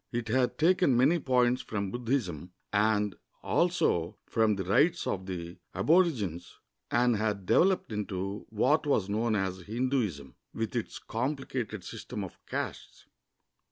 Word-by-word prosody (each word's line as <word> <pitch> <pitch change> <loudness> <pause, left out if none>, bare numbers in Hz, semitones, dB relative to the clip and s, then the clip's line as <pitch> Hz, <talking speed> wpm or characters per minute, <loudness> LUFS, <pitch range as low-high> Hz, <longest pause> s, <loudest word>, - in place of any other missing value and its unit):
It 115 -2 -3
had 125 +1 +1
taken 175 -5 +4
many 145 +8 +4
points 125 -2 +2
from 100 -3 -3
Buddhism 110 - -2 0.2
and 105 -1 +2 0.3
also 130 - +1
from 110 -2 +2
the 95 - -3
rites 165 - +3
of 95 -1 -3
the 85 -2 -6 0.2
aborigines, 120 - +1 0.3
and 120 -1 +3
had 105 -2 -1
developed 185 - +3
into 100 -1 -4
what 135 +8 +2
was 105 -9 +1
known 110 +2 +1
as 95 -2 -1
Hinduism, 105 - -2 0.2
with 115 +1 -3
its 120 - -3
complicated 125 - -3
system 115 0 -6
of 95 - -10
castes. - - -5
110 Hz, 130 wpm, -30 LUFS, 95-130 Hz, 0.3 s, taken